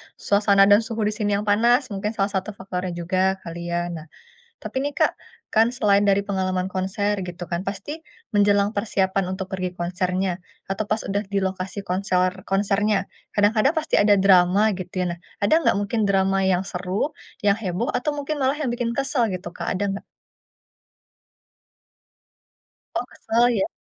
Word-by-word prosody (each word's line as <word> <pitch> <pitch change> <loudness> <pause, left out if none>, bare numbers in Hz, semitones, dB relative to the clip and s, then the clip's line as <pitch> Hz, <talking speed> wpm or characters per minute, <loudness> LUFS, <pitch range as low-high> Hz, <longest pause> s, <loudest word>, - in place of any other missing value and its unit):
suasana 200 -1 +3
dan 205 - +8
suhu 225 -1 -3
di 210 - +1
sini 210 -2 0
yang 200 - -1
panas, 235 +5 +3
mungkin 210 +2 -3
salah 200 0 0
1 195 +2 -3
faktornya 185 -2 -4
juga 185 +2 +1
kali 170 0 -6
ya. 175 0 -1
Nah 160 -1 -7 0.5
tapi - - -5
nih 285 +2 -1
Kak, - - +1 0.3
kan 225 +2 +3
selain 205 -4 +3
dari 200 0 +3
pengalaman 190 -2 -1
konser 200 +2 -1
gitu 175 0 -7
kan, 170 +2 -3
pasti 250 +10 -5 0.3
menjelang 205 -1 +3
persiapan 190 -2 0
untuk 190 0 -5
pergi 185 -2 -3
konsernya, 180 +1 -1 0.3
atau 195 +2 -2
pas 215 +1 -1
udah 205 +2 -2
di 200 - +2
lokasi 190 +1 -3
konsor 185 -1 0
konsernya. 200 +1 +1 0.2
Kadang-kadang 215 +7 +3
pasti 315 -1 0
ada 205 0 +5
drama 190 +2 +5
gitu 185 0 -4
ya. - - 0
Nah, - - -25 0.2
ada 205 - +3
enggak - - +5
mungkin 210 +1 0
drama 195 -1 +2
yang 185 -1 +2
seru, 190 +6 -2 0.3
yang 205 -1 +3
heboh, 210 +2 -2
atau 295 +4 -1
mungkin 290 +1 -3
malah 265 -1 +2
yang 270 - 0
bikin 240 -1 -2
kesel 275 -1 +1
gitu 180 -1 -5
Kak, - - -7
ada 185 +2 -2
enggak? 195 +1 -4 2.9
Oh, 235 - 0
kesel 235 +2 +1
ya? 200 -4 0
200 Hz, 165 wpm, -23 LUFS, 185-215 Hz, 2.9 s, dan